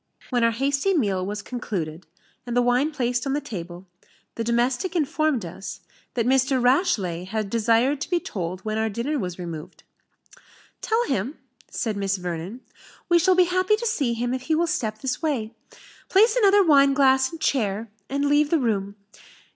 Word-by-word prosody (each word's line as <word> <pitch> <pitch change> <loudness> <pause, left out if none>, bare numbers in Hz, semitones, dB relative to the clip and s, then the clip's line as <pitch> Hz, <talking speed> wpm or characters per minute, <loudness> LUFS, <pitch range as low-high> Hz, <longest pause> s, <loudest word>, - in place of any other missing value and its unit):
When 245 -2 +2
our 230 - +5
hasty 275 - 0
meal 200 - +1
was 200 +1 -4
concluded, 175 -9 -5 0.4
and 240 0 -2
the - - +5
wine 245 +5 +2
placed 250 -3 -1
on 270 - 0
the 290 - +1
table, 180 -9 -8 0.5
the 230 - -3
domestic 245 - 0
informed 310 - 0
us, 185 +4 -8 0.3
"that 235 -2 0
Mr. 265 +1 +2
Rashleigh 215 - +1
had 215 0 -3
desired 235 +5 +2
to - - -4
be 350 -1 +2
told 185 - -5
when 215 +1 -2
our 220 0 0
dinner 245 +8 -2
was 180 -3 -4
removed." 170 -1 -8 1.0
"Tell 450 +2 +1
him," 265 +4 -2 0.3
said 220 -4 -3
Miss 195 -1 0
Vernon, 180 +6 -5 0.5
"we 345 0 +5
shall 370 +2 +4
be 365 - +6
happy 370 +4 +2
to 455 +2 -5
see 285 - 0
him 240 +2 -2
if 260 - -3
he 315 +5 0
will 335 +2 +2
step 225 -11 -2
this 265 +2 -2
way 255 -9 -2 0.6
place 430 +4 +5
another 405 -4 +5
wineglass 275 -3 +4
and 330 - -8
chair, 220 -6 -1 0.2
and 280 +2 -1
leave 290 +1 +3
the 330 - +3
room. 205 -6 -1
245 Hz, 175 wpm, -24 LUFS, 205-295 Hz, 1.0 s, be